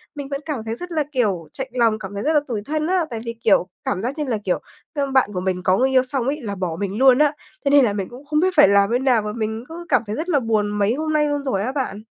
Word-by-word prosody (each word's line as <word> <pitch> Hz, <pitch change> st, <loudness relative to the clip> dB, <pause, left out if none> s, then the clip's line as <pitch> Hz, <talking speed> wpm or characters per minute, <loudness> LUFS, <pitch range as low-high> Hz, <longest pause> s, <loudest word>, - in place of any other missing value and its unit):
mình 285 Hz, -2 st, -6 dB
vẫn 275 Hz, 0 st, -4 dB
cảm 280 Hz, -8 st, -3 dB
thấy 225 Hz, 0 st, -3 dB
rất 355 Hz, +8 st, -8 dB
là, 310 Hz, -3 st, +1 dB
kiểu, 200 Hz, -, 0 dB
chạnh 265 Hz, -2 st, -4 dB
lòng, 230 Hz, -3 st, +2 dB
cảm 195 Hz, -1 st, -7 dB
thấy 200 Hz, -, -4 dB
rất 310 Hz, -, +1 dB
là 300 Hz, -, +5 dB
tủi 225 Hz, -5 st, -3 dB
thân 310 Hz, +1 st, -1 dB
á, 365 Hz, -2 st, +1 dB
tại 230 Hz, -3 st, -5 dB
vì, 230 Hz, 0 st, -4 dB
kiểu, 195 Hz, -4 st, +4 dB, 0.2 s
cảm 190 Hz, -, -1 dB
giác 255 Hz, +7 st, -3 dB
như 300 Hz, -, -1 dB
là, 250 Hz, -6 st, -1 dB
kiểu, 185 Hz, -, 0 dB, 0.3 s
ơ, 280 Hz, -3 st, -1 dB
bạn 265 Hz, -5 st, +3 dB
của 180 Hz, -, -2 dB
mình 185 Hz, -1 st, -2 dB
có 185 Hz, 0 st, +3 dB
người 265 Hz, +1 st, +3 dB
yêu 260 Hz, -1 st, +4 dB
xong 260 Hz, -2 st, -2 dB
ấy 290 Hz, +3 st, -1 dB
là 205 Hz, -4 st, -4 dB
bỏ 180 Hz, -4 st, -3 dB
mình 200 Hz, 0 st, -3 dB
luôn 260 Hz, 0 st, +6 dB
á. 300 Hz, -1 st, +3 dB, 0.3 s
Thế 280 Hz, -, +3 dB
nên 285 Hz, -3 st, +6 dB
là 205 Hz, -, 0 dB
mình 195 Hz, -2 st, -3 dB
cũng 250 Hz, +4 st, -12 dB
không 300 Hz, +1 st, +1 dB
biết 370 Hz, +3 st, +3 dB
phải 295 Hz, -, +8 dB
làm 200 Hz, 0 st, +4 dB
thế 245 Hz, -, +2 dB
nào 255 Hz, -4 st, +3 dB
mà 210 Hz, 0 st, -4 dB
mình 220 Hz, +1 st, -3 dB
cứ 345 Hz, +1 st, -8 dB
cảm 255 Hz, -, +4 dB
thấy 210 Hz, -, -3 dB
rất 325 Hz, +7 st, -4 dB
là 295 Hz, -5 st, +3 dB
buồn 220 Hz, -4 st, 0 dB
mấy 205 Hz, +1 st, +1 dB
hôm 310 Hz, +3 st, -2 dB
nay 300 Hz, 0 st, +3 dB
luôn 290 Hz, -1 st, -1 dB
rồi 260 Hz, -8 st, -1 dB
á 255 Hz, -, -1 dB
bạn. 255 Hz, -7 st, -3 dB
250 Hz, 315 wpm, -21 LUFS, 210-290 Hz, 0.3 s, phải